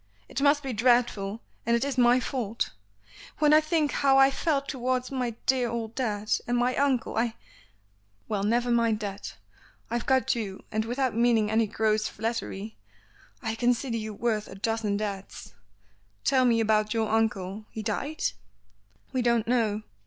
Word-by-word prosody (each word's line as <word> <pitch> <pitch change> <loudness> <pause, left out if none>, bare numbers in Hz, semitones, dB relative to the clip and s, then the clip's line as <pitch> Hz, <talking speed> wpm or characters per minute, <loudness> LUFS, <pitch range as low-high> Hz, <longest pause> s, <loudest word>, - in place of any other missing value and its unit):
It - - -4
must 290 +1 +4
be 265 -2 -3
dreadful, 230 -3 +2 0.2
and 235 - +2
it 235 +3 +1
is 280 -2 -2
my 245 0 +5
fault. 235 -3 -2 0.7
When 300 -1 +4
I 310 - +7
think 310 -1 +1
how 270 -1 +3
I 270 0 +6
felt 280 -1 0
towards 255 -1 -1
my 250 -4 -2
dear 255 -2 +2
old 230 -1 -4
dad, 215 -5 -3 0.2
and 245 0 +1
my 245 +1 +1
uncle 270 -6 0
I 230 0 0 0.4
" 100 0 -40
"Well, 210 -2 -1
never 240 +4 +1
mind 230 -2 +2
that. 200 -1 -5 0.6
I've 235 0 -2
got 265 -1 +3
you, 205 -6 -5
and 220 0 0
without 250 +2 -1
meaning 230 -2 +3
any 220 0 +2
gross 215 0 +1
flattery, 220 -2 -4 0.7
I 220 -1 -1
consider 240 +1 0
you 215 -1 -5
worth 215 -1 -1
a - - -10
dozen 215 0 -1
dads. 200 -2 -6 0.7
Tell 260 -2 +3
me 230 -2 +3
about 215 0 +2
your 220 -1 +1
uncle. 210 -2 -1
He 220 - -6
died?" 275 +9 -3 0.9
"We 255 - +1
don't 235 -2 +2
know. 220 -3 +1
230 Hz, 165 wpm, -27 LUFS, 215-255 Hz, 0.9 s, I